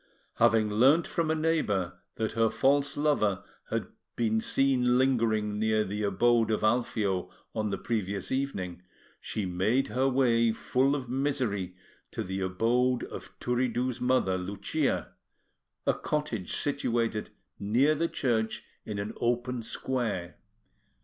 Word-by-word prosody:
Having 115 Hz, -2 st, +4 dB
learnt 135 Hz, +10 st, +5 dB
from 165 Hz, -2 st, -1 dB
a 160 Hz, -, +2 dB
neighbour 110 Hz, -, 0 dB, 0.2 s
that 110 Hz, -1 st, -1 dB
her 115 Hz, 0 st, +2 dB
false 140 Hz, +3 st, +2 dB
lover 125 Hz, -10 st, +1 dB, 0.3 s
had -, -, -1 dB, 0.3 s
been 110 Hz, -1 st, +1 dB
seen 125 Hz, -2 st, +2 dB
lingering 110 Hz, -5 st, +1 dB
near 110 Hz, 0 st, +2 dB
the 105 Hz, +1 st, -4 dB
abode 115 Hz, +3 st, +3 dB
of 110 Hz, -, 0 dB
Alfio 110 Hz, -4 st, +1 dB, 0.2 s
on 105 Hz, -1 st, -1 dB
the 100 Hz, -, -2 dB
previous 100 Hz, -4 st, -2 dB
evening, 100 Hz, -10 st, -2 dB, 0.4 s
she 105 Hz, -, -3 dB
made 105 Hz, +9 st, +1 dB
her 130 Hz, +2 st, +1 dB
way, 120 Hz, -3 st, +3 dB
full 130 Hz, +5 st, +1 dB
of 135 Hz, -3 st, -4 dB
misery, 125 Hz, -8 st, -1 dB, 0.3 s
to -, -, -4 dB
the 95 Hz, +1 st, -4 dB
abode 120 Hz, +7 st, +1 dB
of -, -, -9 dB
Turiddu's 125 Hz, 0 st, -1 dB
mother, 125 Hz, -7 st, +2 dB
Lucia, 95 Hz, +2 st, -1 dB, 0.7 s
a -, -, +3 dB
cottage 135 Hz, -, -3 dB
situated 115 Hz, -6 st, 0 dB, 0.3 s
near 120 Hz, +9 st, +3 dB
the 165 Hz, +2 st, 0 dB
church 110 Hz, -4 st, -1 dB, 0.2 s
in 105 Hz, -, -5 dB
an 100 Hz, +1 st, -4 dB
open 120 Hz, +1 st, -1 dB
square. 115 Hz, -6 st, -3 dB
115 Hz, 130 wpm, -29 LUFS, 105-130 Hz, 0.7 s, learnt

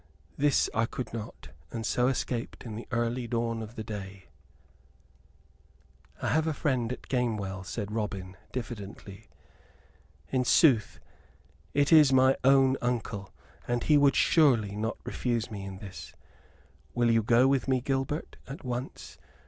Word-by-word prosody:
This 145 Hz, 0 st, +3 dB
I 115 Hz, +1 st, +1 dB
would 125 Hz, -3 st, -4 dB
not; 110 Hz, -3 st, -7 dB, 0.2 s
and 115 Hz, -1 st, -4 dB
so 125 Hz, +3 st, +2 dB
escaped 125 Hz, -3 st, -3 dB
in 110 Hz, -3 st, -6 dB
the 115 Hz, -, -7 dB
early 120 Hz, 0 st, -1 dB
dawn 115 Hz, -1 st, -1 dB
of 110 Hz, +2 st, -8 dB
the 110 Hz, -, -5 dB
day 100 Hz, -3 st, -8 dB, 0.8 s
" 65 Hz, +1 st, -31 dB
"I -, -, +1 dB
have 160 Hz, +1 st, +2 dB
a 155 Hz, -, -1 dB
friend 125 Hz, -6 st, 0 dB
at 125 Hz, -, -6 dB
Gamewell," 105 Hz, -7 st, -1 dB
said 100 Hz, +2 st, -5 dB
Robin, 100 Hz, -4 st, -4 dB, 0.2 s
diffidently. 105 Hz, -5 st, -7 dB, 1.0 s
"In 130 Hz, -1 st, +2 dB
sooth, 125 Hz, -, +4 dB, 0.8 s
it 145 Hz, +2 st, +3 dB
is 150 Hz, -4 st, +8 dB
mine 130 Hz, 0 st, +5 dB
own 135 Hz, 0 st, +5 dB
uncle, 110 Hz, -5 st, -3 dB, 0.4 s
and 120 Hz, -1 st, 0 dB
he 150 Hz, -2 st, +5 dB, 0.2 s
surely 130 Hz, -10 st, +4 dB
would 100 Hz, -, -7 dB
not 110 Hz, +1 st, -2 dB
refuse 120 Hz, -3 st, -2 dB
me 100 Hz, -2 st, -6 dB
in 95 Hz, -1 st, -7 dB
this. 95 Hz, -1 st, -10 dB, 0.8 s
Will 120 Hz, -1 st, +3 dB
you 115 Hz, 0 st, +4 dB
go 120 Hz, +4 st, +4 dB
with 135 Hz, -1 st, +1 dB
me, 130 Hz, -1 st, +2 dB
Gilbert, 135 Hz, +4 st, -2 dB
at 135 Hz, +4 st, -8 dB
once? 125 Hz, 0 st, -6 dB
120 Hz, 150 wpm, -29 LUFS, 105-130 Hz, 1.0 s, is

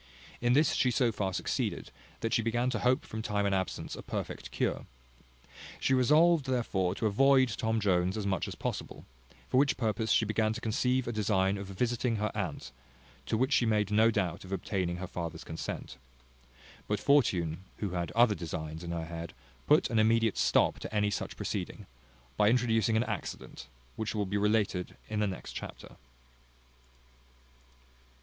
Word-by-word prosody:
In 120 Hz, +1 st, +3 dB
this 145 Hz, +2 st, +4 dB
she 130 Hz, -, +2 dB
so 120 Hz, -1 st, +2 dB
far 100 Hz, -3 st, -2 dB
succeeded, -, -, -2 dB, 0.3 s
that 115 Hz, -, -1 dB
she -, -, +3 dB
began 120 Hz, +3 st, 0 dB
to 110 Hz, -, -1 dB
hope 130 Hz, +6 st, +2 dB
from 110 Hz, -, -5 dB
time 105 Hz, -2 st, -1 dB
and 100 Hz, -, +1 dB
absence 95 Hz, -1 st, -2 dB
a -, -, -8 dB
perfect -, -, -5 dB
cure. -, -, -2 dB, 0.9 s
She 135 Hz, -, +1 dB
resolved 150 Hz, +4 st, +4 dB
therefore 100 Hz, -8 st, 0 dB
to 110 Hz, -, -2 dB
avoid 130 Hz, +4 st, +4 dB
Tom 110 Hz, 0 st, -1 dB
Jones 95 Hz, -1 st, +1 dB
as 105 Hz, -, -3 dB
much 95 Hz, -2 st, 0 dB
as -, -, -6 dB
possible; -, -, -5 dB, 0.4 s
for -, -, +1 dB
which 140 Hz, +1 st, +3 dB
purpose 110 Hz, -1 st, 0 dB
she 115 Hz, -, +4 dB
began 110 Hz, +1 st, +1 dB
to 115 Hz, -, -5 dB
conceive 125 Hz, +3 st, 0 dB
a -, -, -1 dB
design 100 Hz, -3 st, +1 dB
of 100 Hz, -1 st, -6 dB
visiting 120 Hz, +4 st, -1 dB
her 105 Hz, -1 st, -1 dB
aunt, 65 Hz, -, -4 dB, 0.6 s
to 110 Hz, -, 0 dB
which 130 Hz, +4 st, +1 dB
she 120 Hz, -, +3 dB
made 105 Hz, -2 st, +1 dB
no 110 Hz, +2 st, +5 dB
doubt 90 Hz, -6 st, -1 dB
of 95 Hz, -, -11 dB
obtaining 90 Hz, -2 st, -2 dB
her 95 Hz, -, -4 dB
father's 85 Hz, -3 st, -5 dB
consent. 80 Hz, -4 st, -6 dB, 0.9 s
But 105 Hz, -, 0 dB
Fortune, 95 Hz, -, +2 dB, 0.2 s
who 100 Hz, -3 st, -3 dB
had 85 Hz, -1 st, -2 dB
other 115 Hz, -1 st, +5 dB
designs 80 Hz, -2 st, -5 dB
in 85 Hz, -, -6 dB
her 85 Hz, -1 st, -3 dB
head, 85 Hz, 0 st, -7 dB, 0.3 s
put 150 Hz, -3 st, +4 dB
an 115 Hz, -, +2 dB
immediate 110 Hz, -1 st, +3 dB
stop -, -, +3 dB
to -, -, -7 dB
any 105 Hz, -1 st, +1 dB
such -, -, -4 dB
proceeding, -, -, -4 dB, 0.5 s
by 105 Hz, -, +5 dB
introducing 115 Hz, -2 st, +2 dB
an 115 Hz, -, +3 dB
accident, 110 Hz, -5 st, -6 dB, 0.3 s
which 110 Hz, 0 st, -3 dB
will 105 Hz, -1 st, 0 dB
be 100 Hz, +2 st, -1 dB
related 105 Hz, -3 st, 0 dB
in 105 Hz, -1 st, -2 dB
the 105 Hz, -, +2 dB
next 95 Hz, -3 st, -6 dB
chapter. -, -, -8 dB
110 Hz, 175 wpm, -30 LUFS, 95-120 Hz, 0.9 s, no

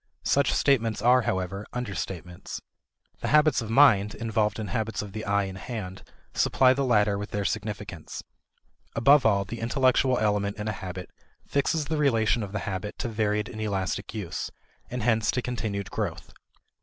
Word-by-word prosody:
Such 140 Hz, -1 st, +3 dB
statements 115 Hz, -6 st, +2 dB
are, 125 Hz, +2 st, +6 dB
however, 95 Hz, -1 st, -2 dB
understatements. 95 Hz, -7 st, -5 dB, 0.6 s
The -, -, -3 dB
habits 150 Hz, -3 st, +4 dB
of 110 Hz, -, -6 dB
mind 110 Hz, -5 st, +5 dB
involved 110 Hz, -1 st, 0 dB
in 110 Hz, -3 st, -4 dB
habits 110 Hz, +3 st, -2 dB
of 100 Hz, -2 st, -9 dB
the 110 Hz, -, -5 dB
eye 100 Hz, 0 st, +2 dB
and 95 Hz, -1 st, -6 dB
hand 100 Hz, -5 st, -6 dB, 0.3 s
supply 130 Hz, -1 st, +4 dB
the 140 Hz, +1 st, -1 dB
latter 105 Hz, -5 st, +3 dB
with 105 Hz, -, -5 dB
their 100 Hz, -1 st, -2 dB
significance. 105 Hz, -5 st, -4 dB, 0.7 s
Above 135 Hz, +2 st, +6 dB
all, 100 Hz, -2 st, +2 dB
the 115 Hz, +4 st, -6 dB
intellectual 130 Hz, +1 st, +2 dB
element 105 Hz, -2 st, 0 dB
in 105 Hz, 0 st, -4 dB
a -, -, +1 dB
habit 90 Hz, -2 st, -7 dB, 0.4 s
fixes 145 Hz, +2 st, +1 dB
the 155 Hz, +2 st, -2 dB
relation 120 Hz, -5 st, +2 dB
of 100 Hz, -2 st, -5 dB
the 105 Hz, -1 st, -3 dB
habit 100 Hz, +1 st, -4 dB
to 120 Hz, -, -3 dB
varied 105 Hz, -1 st, 0 dB
and 110 Hz, -2 st, -7 dB
elastic 95 Hz, -3 st, -2 dB
use, 100 Hz, -6 st, -4 dB, 0.4 s
and 125 Hz, -2 st, -4 dB
hence 110 Hz, -2 st, +2 dB
to -, -, +1 dB
continued 110 Hz, -5 st, -3 dB
growth. -, -, -4 dB
110 Hz, 170 wpm, -27 LUFS, 100-125 Hz, 0.7 s, are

